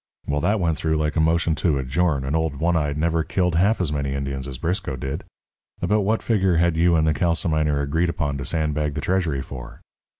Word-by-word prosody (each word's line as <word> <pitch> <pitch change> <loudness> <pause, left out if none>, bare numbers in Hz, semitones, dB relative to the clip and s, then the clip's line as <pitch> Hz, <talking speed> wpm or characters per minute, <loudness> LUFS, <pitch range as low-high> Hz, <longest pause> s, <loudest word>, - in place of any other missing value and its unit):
Well, 75 0 -1
that 105 +6 +1
went 85 -4 0
through 80 -1 0
like 75 0 -1
a - - +1
motion 80 +1 +2
to 80 -4 +1
adjourn, 70 +1 0
and 70 +4 -1
old 80 -3 0
One 85 +4 +1
Eyed 75 -3 0
never 80 +1 +1
killed 90 +1 0
half 100 +7 +3
as 85 -5 0
many 70 -1 -2
Indians 70 -1 -3
as 65 -2 -6
Briscoe 85 - -2
did. 65 +3 -4 0.6
About 105 0 +1
what 110 +3 0
figure 95 -6 +2
had 85 0 +2
you 85 +1 +3
and 80 -1 +3
the 80 - +3
calciminer 80 -4 +1
agreed 80 +5 0
upon 75 -5 -2
to - - -3
sandbag 75 -3 -1
the 75 - -2
treasury 85 -6 0
for?" 65 -3 -9
80 Hz, 220 wpm, -23 LUFS, 70-85 Hz, 0.6 s, half